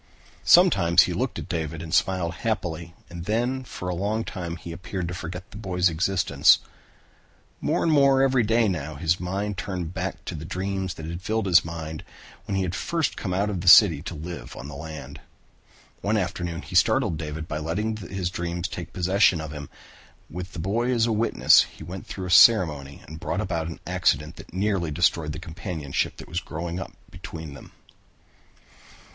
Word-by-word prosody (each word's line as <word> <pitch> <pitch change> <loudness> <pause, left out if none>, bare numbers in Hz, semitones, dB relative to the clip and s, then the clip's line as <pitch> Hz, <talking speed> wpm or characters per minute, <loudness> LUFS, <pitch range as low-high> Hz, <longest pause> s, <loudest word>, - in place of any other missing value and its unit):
Sometimes 100 - +6
he - - -2
looked - - -2
at - - -6
David 80 -2 -3
and 80 - -7
smiled 90 -3 +1
happily 85 -6 -3
and 85 -1 -8
then 120 +5 0
for 90 -6 -7
a 90 - -1
long 105 +5 -1
time 85 -6 -5
he 85 +1 -8
appeared 90 +1 -5
to 90 - -4
forget 90 0 -7
the 105 - -9
boy's 90 -4 +1
existence. 90 +3 +4 1.0
More - - 0
and 165 - +2
more 140 -2 +5
every 130 -2 +3
day 115 +1 +3
now 80 -5 -3
his 85 +3 +1
mind 100 +2 -3
turned 90 -4 -4
back 95 0 -2
again - - -28
to - - -4
the 80 -2 -6
dreams 95 +1 -3
that 80 - -8
had 85 +2 -5
filled 110 +3 -1
his 90 -3 +5
mind 80 -1 -6 0.4
when 100 - -2
he 95 - +1
had 90 -1 -2
first 165 - -1
come 95 - -4
out 100 +3 0
of 95 -4 -3
the 90 - -6
city 85 -5 +8
to 85 +1 -6
live 85 +3 -7
on 65 - -8
the 75 - -8
land. 80 +1 -8 0.8
One 105 +2 +1
afternoon 85 -3 -3
he - - -11
startled 80 - +3
David 80 0 -5
by 75 - -3
letting 105 +8 -2
his 95 -2 -4
dreams 85 0 -3
take 90 -2 -6
entire - - -29
possession 95 0 +3
of 80 -1 -6
him. 75 -2 -7 0.6
With 90 +2 -6
the - - -8
boy 110 +8 0
as 115 -2 +3
a 120 - 0
witness, 110 +1 +5
he - - -10
went 90 +1 -8
through 95 - -5
a 90 - -4
ceremony 75 -10 +5
and 80 +1 -9
brought 85 +2 -2
about 85 -6 -2
an 85 - -7
accident 85 -3 0
that 85 - -12
nearly 95 -3 0
destroyed 80 0 +1
the - - -6
companionship 80 -4 -3
that - - -10
was 85 - -2
growing 85 +1 -5
up - - -7 0.2
between 80 -3 -8
them. 70 - -12
90 Hz, 195 wpm, -25 LUFS, 80-100 Hz, 1.0 s, city